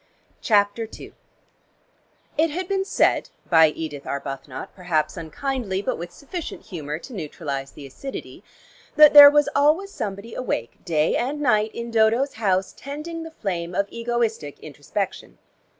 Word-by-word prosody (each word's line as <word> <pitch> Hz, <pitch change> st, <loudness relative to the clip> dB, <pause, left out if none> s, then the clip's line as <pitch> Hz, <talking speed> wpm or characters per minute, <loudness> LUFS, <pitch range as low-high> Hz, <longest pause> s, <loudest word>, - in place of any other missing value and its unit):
CHAPTER 210 Hz, +1 st, +2 dB
II -, -, -11 dB, 1.2 s
It 320 Hz, +2 st, +3 dB
had 350 Hz, +4 st, -4 dB
been 390 Hz, 0 st, 0 dB
said, 400 Hz, +2 st, +2 dB, 0.2 s
by 160 Hz, -2 st, +6 dB
Edith 150 Hz, -2 st, -6 dB
Arbuthnot, 135 Hz, -1 st, -6 dB
perhaps 175 Hz, -5 st, -1 dB
unkindly, 195 Hz, -, -3 dB
but -, -, -1 dB
with 175 Hz, +1 st, -6 dB
sufficient 320 Hz, -, -7 dB
humor 150 Hz, -4 st, -5 dB
to 250 Hz, +10 st, -11 dB
neutralize 145 Hz, -6 st, -5 dB
the 145 Hz, -, -10 dB
acidity, 265 Hz, -, -8 dB, 0.5 s
that 300 Hz, -1 st, +8 dB
there 290 Hz, -1 st, +12 dB
was 295 Hz, 0 st, +3 dB
always 310 Hz, +8 st, +3 dB
somebody 205 Hz, -, -5 dB
awake 120 Hz, -, -4 dB
day 160 Hz, -3 st, +1 dB
and 275 Hz, +5 st, -1 dB
night 215 Hz, -6 st, +2 dB
in 235 Hz, 0 st, -5 dB
Dodo's 230 Hz, +5 st, +3 dB
house 190 Hz, -4 st, 0 dB
tending 305 Hz, +4 st, -6 dB
the 325 Hz, -, -7 dB
flame 180 Hz, -, -4 dB
of 200 Hz, -, +2 dB
egoistic 230 Hz, -10 st, -2 dB
introspection. -, -, -5 dB
215 Hz, 140 wpm, -23 LUFS, -, 1.2 s, there